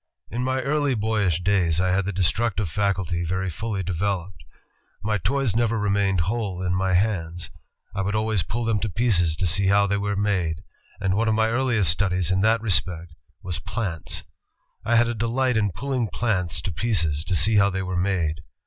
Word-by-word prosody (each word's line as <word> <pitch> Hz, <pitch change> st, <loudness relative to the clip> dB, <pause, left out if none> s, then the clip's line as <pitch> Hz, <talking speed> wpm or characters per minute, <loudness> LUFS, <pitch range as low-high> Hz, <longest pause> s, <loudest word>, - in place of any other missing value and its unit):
"In 120 Hz, +1 st, -2 dB
my 130 Hz, +1 st, 0 dB
early 145 Hz, -1 st, +1 dB
boyish 105 Hz, -6 st, 0 dB
days, 90 Hz, -5 st, +2 dB
I 90 Hz, 0 st, +2 dB
had 95 Hz, 0 st, +1 dB
the 100 Hz, -, -1 dB
destructive 100 Hz, +3 st, 0 dB
faculty 95 Hz, -4 st, -1 dB
very 95 Hz, +2 st, -2 dB
fully 100 Hz, +3 st, -3 dB
developed. 90 Hz, -2 st, -3 dB, 0.6 s
My 105 Hz, 0 st, 0 dB
toys 130 Hz, -, 0 dB
never 115 Hz, -1 st, +1 dB
remained 100 Hz, -3 st, +1 dB
whole 100 Hz, -1 st, -2 dB
in 90 Hz, -1 st, 0 dB
my 95 Hz, 0 st, 0 dB
hands. 90 Hz, -4 st, -1 dB, 0.4 s
I 100 Hz, -, -2 dB
would 100 Hz, +2 st, -1 dB
always 110 Hz, -2 st, +1 dB
pull 115 Hz, +9 st, -3 dB
them 110 Hz, -2 st, +1 dB
to 105 Hz, -, -2 dB
pieces 90 Hz, -6 st, +2 dB
to 90 Hz, -, -1 dB
see 90 Hz, +3 st, +2 dB
how 100 Hz, +1 st, +4 dB
they 100 Hz, 0 st, 0 dB
were 100 Hz, 0 st, -1 dB
made, 95 Hz, -4 st, -1 dB, 0.4 s
and 95 Hz, -2 st, 0 dB
one 115 Hz, +2 st, +1 dB
of 110 Hz, -, +2 dB
my 110 Hz, 0 st, +2 dB
earliest 115 Hz, -7 st, +2 dB
studies 90 Hz, -1 st, 0 dB
in 95 Hz, +1 st, +2 dB
that 110 Hz, +2 st, +3 dB
respect 90 Hz, -5 st, 0 dB, 0.3 s
was 90 Hz, -2 st, -3 dB
plants. 95 Hz, -2 st, -4 dB, 0.6 s
I 120 Hz, -, +1 dB
had 120 Hz, 0 st, +4 dB
a 120 Hz, -, -1 dB
delight 120 Hz, +3 st, 0 dB
in 105 Hz, -2 st, +2 dB
pulling 125 Hz, +5 st, -2 dB
plants 90 Hz, -10 st, -1 dB
to -, -, -2 dB
pieces 85 Hz, -6 st, 0 dB
to 95 Hz, -, 0 dB
see 105 Hz, +7 st, +4 dB
how 100 Hz, 0 st, +5 dB
they 95 Hz, -1 st, -3 dB
were 95 Hz, 0 st, -3 dB
made. 90 Hz, -5 st, 0 dB
100 Hz, 195 wpm, -24 LUFS, 90-110 Hz, 0.6 s, how